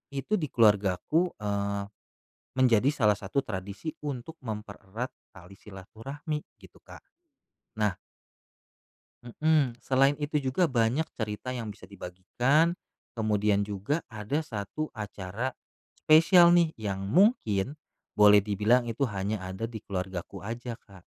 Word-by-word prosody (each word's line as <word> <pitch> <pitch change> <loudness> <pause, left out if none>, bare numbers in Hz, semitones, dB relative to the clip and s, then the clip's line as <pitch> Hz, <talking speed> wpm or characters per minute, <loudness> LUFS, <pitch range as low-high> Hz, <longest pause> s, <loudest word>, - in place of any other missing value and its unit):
itu 140 +10 0
di 150 - -2
keluargaku, 105 - +3
eee, 100 -1 -1 0.8
menjadi 125 0 +4
salah 105 -8 +3
satu 105 +7 -2
tradisi 100 - -5
untuk 145 +2 -5
mempererat 105 +1 -6 0.2
tali 95 -1 -14
silaturahmi 125 - -6 0.2
gitu, - - -17
Kak. - - -14 0.8
Nah 105 -3 +1 1.3
Mhm, 135 -1 +1
selain 135 +1 +3
itu 150 +1 -1
juga 145 +5 +1
banyak 125 +4 +1
cerita 105 +2 -4
yang 115 -4 -4
bisa 100 - -15
dibagikan, 120 - 0 0.4
kemudian 105 -2 +1
juga 105 - -2
ada 110 +9 -2
satu 125 +5 -5
acara 105 +3 -5 0.4
spesial 170 +2 +6
nih 170 -2 +3
yang 100 -3 -4
mungkin 140 - +3 0.4
boleh 105 -1 +6
dibilang 105 +4 +2
itu 120 +3 -1
hanya 100 +1 -2
ada 95 +3 -5
di 115 -1 -5
keluargaku 95 -2 -5
aja, 120 +2 -5
Kak. 95 -5 -18
110 Hz, 120 wpm, -28 LUFS, 100-140 Hz, 1.3 s, spesial